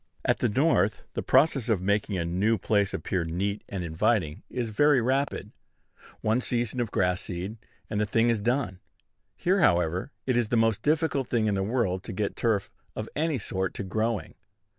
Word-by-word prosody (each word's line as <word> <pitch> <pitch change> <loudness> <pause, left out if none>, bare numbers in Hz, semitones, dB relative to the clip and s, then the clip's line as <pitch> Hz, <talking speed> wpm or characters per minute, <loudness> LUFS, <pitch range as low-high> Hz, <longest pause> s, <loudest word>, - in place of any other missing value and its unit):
At - - +2
the - - +2
North, 110 -5 +2
the - - -2
process 135 -6 +3
of 110 -5 +3
making 100 +1 0
a 85 - -1
new 100 +7 +1
place 100 0 +1
appear 90 -3 -2
neat 95 +5 -2
and 95 -3 -4
inviting 80 0 0
is 120 -3 -3
very 145 +6 +4
rapid. 135 +4 -1 0.7
One 110 +3 +1
season 120 0 -1
of 120 -3 0
grass 90 0 +1
seed, 95 +4 -5 0.3
and 105 -1 -1
the 105 - 0
thing 115 +2 +3
is 115 - 0
done. 115 -4 -1 0.6
Here, 190 +3 +2
however, 90 - +2
it 130 -2 +1
is 120 -2 +2
the 120 - +2
most 115 -1 +2
difficult 150 -3 +1
thing 115 -3 +1
in 105 - +1
the 95 - 0
world 100 -3 0
to - - -6
get 100 +1 -2
turf 105 -4 0 0.2
of 110 - -5
any 155 -2 0
sort 95 -4 -2
to - - -4
growing. 110 +2 -2
110 Hz, 185 wpm, -27 LUFS, 95-120 Hz, 0.7 s, very